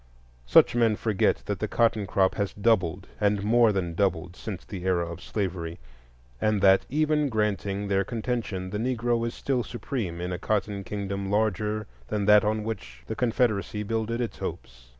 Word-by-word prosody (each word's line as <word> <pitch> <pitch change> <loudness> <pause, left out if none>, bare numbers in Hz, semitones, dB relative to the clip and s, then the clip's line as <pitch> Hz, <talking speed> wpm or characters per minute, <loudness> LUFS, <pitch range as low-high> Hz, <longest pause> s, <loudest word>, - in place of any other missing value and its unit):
Such - - +6
men 115 -3 +3
forget 105 -2 +1
that - - -3
the - - -1
cotton 115 -3 +1
crop 95 0 +2
has 100 -2 -2
doubled, 100 -4 +1
and 105 -1 +2
more 115 +1 +5
than 90 -4 -2
doubled, 90 -2 0
since 100 -4 -7
the 95 -3 -7
era 90 -2 +1
of 85 0 -7
slavery, 90 -5 -3 0.6
and 110 -1 +2
that, 95 -1 +5
even 150 0 +2
granting 105 -2 -1
their 100 0 +2
contention, 110 -4 -3
the 105 - -2
Negro 120 -1 0
is 115 - -5
still 130 -3 0
supreme 115 - -4
in 90 +1 -3
a 90 - -4
Cotton 100 -1 -1
Kingdom 100 0 -4
larger 105 0 0 0.2
than 105 -1 -1
that 105 0 +7
on 105 0 0
which 95 - -6
the 110 - -4
Confederacy 110 -3 0
builded 115 +2 -2
its 120 - -4
hopes. 60 0 -7
105 Hz, 170 wpm, -27 LUFS, 95-115 Hz, 0.6 s, that